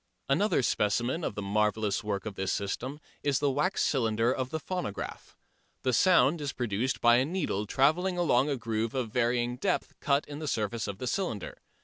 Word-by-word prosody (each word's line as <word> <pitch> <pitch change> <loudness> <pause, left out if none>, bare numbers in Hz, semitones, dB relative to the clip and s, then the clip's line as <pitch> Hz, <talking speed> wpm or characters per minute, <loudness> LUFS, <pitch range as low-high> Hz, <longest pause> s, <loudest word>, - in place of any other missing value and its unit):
Another 140 +1 +2
specimen 120 +9 +1
of 105 - -2
the 105 - -4
marvellous 105 +1 0
work 100 -2 -2
of 110 - -4
this 95 0 -2
system 125 +8 -3 0.2
is 140 -2 +1
the 145 -1 +1
wax 150 +8 +1
cylinder 115 -2 +2
of 130 -1 -3
the 160 - -3
phonograph. 175 - -5 0.5
The 130 - +1
sound 170 0 +4
is 140 -2 -3
produced 120 +2 -1
by 120 0 +6
a 125 - +3
needle 150 - -2
trailing 170 - +2
along 145 -5 +3
a 140 - 0
groove 115 0 -2
of 125 -4 -2
varying 120 0 +1
depth 185 +7 -1
cut 140 0 +1
in 145 0 -7
the 155 - -4
surface 110 -2 -1
of 100 -2 -5
the 125 - -5
cylinder. 125 - -3
125 Hz, 190 wpm, -29 LUFS, 110-145 Hz, 0.5 s, by